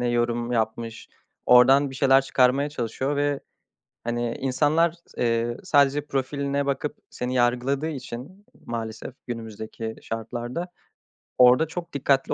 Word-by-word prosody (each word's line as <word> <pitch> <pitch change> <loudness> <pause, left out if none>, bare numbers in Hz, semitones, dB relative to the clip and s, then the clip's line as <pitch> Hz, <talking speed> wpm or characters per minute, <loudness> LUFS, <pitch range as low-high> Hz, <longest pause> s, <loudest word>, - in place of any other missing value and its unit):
ne 125 - 0
yorum 120 0 0
yapmış, 115 0 -2 0.4
oradan 135 +3 +6
bir - - -9
şeyler 135 0 +5
çıkarmaya 135 +2 +2
çalışıyor 135 +2 -2
ve, 145 -1 0 0.6
hani, 120 0 -2
insanlar 150 +5 +2
s 170 0 -8
eee, 115 0 +1
sadece 145 0 +3
profiline 140 +1 -1
bakıp 145 +2 -2
seni 125 +1 -4
yargıladığı 125 +4 +1
için 140 - -8 0.2
maalesef 115 +1 -5
günümüzdeki 110 -1 -6
şartlarda, 120 - -4 0.7
orada 125 +5 +6
çok 170 +2 -7
dikkatli 135 -1 +1
130 Hz, 120 wpm, -25 LUFS, 120-140 Hz, 0.7 s, oradan